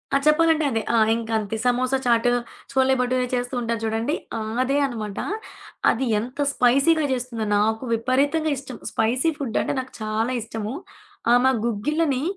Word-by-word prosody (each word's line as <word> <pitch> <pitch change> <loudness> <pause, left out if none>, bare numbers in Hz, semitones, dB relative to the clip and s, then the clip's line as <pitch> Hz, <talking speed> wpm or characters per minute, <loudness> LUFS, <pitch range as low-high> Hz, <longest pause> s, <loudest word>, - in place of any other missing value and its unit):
ఆ! - - +7
చెప్పాలంటే 315 0 +4
అదే. 225 -2 0
ఆ! - - +4 0.2
ఇంకంతే 225 -2 -2
సమోసా 250 +2 +2
చాట్, 235 -1 +3 0.4
చోలే 265 0 +3
బటోరే 250 0 0
చేస్తూ 245 +1 -2
ఉంటారు 230 -1 -2
చూడండి. 225 +7 0 0.2
ఆ! - - -2 0.2
అదే 275 +2 0
అనమాట. 215 -6 -5 0.7
అది 265 +3 +1
ఎంత 250 +6 -7
స్పైసీగా 275 +7 +3
జేస్తుందో 245 -3 -2
నాకు 220 +3 +1
విపరీతంగా 280 +7 +1
ఇష్టం. 260 -2 -8
స్పైసీ 250 +8 +1
ఫుడ్డంటే 265 -2 -1
నాకు 260 0 -7
చాలా 215 +3 -1
ఇష్టము. 220 0 -5 0.6
ఆమా 250 +2 +5
గుగ్గిల్లని, 275 +5 0
250 Hz, 140 wpm, -23 LUFS, 225-270 Hz, 0.7 s, ఆ